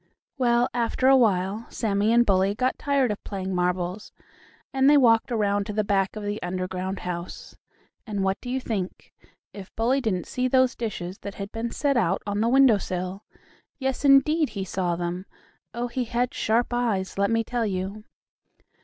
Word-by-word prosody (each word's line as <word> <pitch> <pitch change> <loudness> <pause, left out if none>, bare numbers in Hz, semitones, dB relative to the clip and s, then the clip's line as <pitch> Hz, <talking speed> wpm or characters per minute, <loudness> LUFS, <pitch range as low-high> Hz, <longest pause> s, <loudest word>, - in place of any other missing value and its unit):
Well, 240 -1 +3
after 240 +2 0
a 270 - +7
while, 205 -2 +1
Sammie 210 -1 0
and 240 +1 +5
Bully 195 0 +2
got 255 +3 -1
tired 280 -5 +1
of 205 - -6
playing 190 -1 -4
marbles, 180 +2 -2 0.6
and 270 +1 +4
they 295 - +7
walked 230 -3 +4
around 205 -3 +1
to 210 - -4
the 215 +1 +1
back 195 -1 0
of 215 - -6
the 205 +1 -3
underground 185 +1 -3
house. 175 0 -6 0.5
And 205 -3 -2
what 190 0 -1
do 245 - -7
you 260 +1 -1
think? 205 -7 -5 0.4
If 200 -2 -9
Bully 250 +5 +1
didn't 185 -8 -1
see 255 0 -1
those 255 0 +3
dishes 195 -5 -5
that 200 - -7
had 200 +1 -6
been 230 +1 -3
set 280 +2 0
out 190 -4 +1
on 205 0 -1
the 230 - +2
window 260 -4 +5
sill! 185 +2 -4 0.5
Yes 265 -1 -2
indeed, 285 +3 +4
he 195 - -2
saw 180 -2 -1
them! 175 +2 -4 0.4
Oh, 235 +2 -3
he 245 +1 -2
had 240 +1 -1
sharp 235 +3 0
eyes, 210 -6 -1
let 200 0 +2
me 230 0 +1
tell 235 -1 -1
you! 195 +2 -4
215 Hz, 180 wpm, -25 LUFS, 190-245 Hz, 0.6 s, a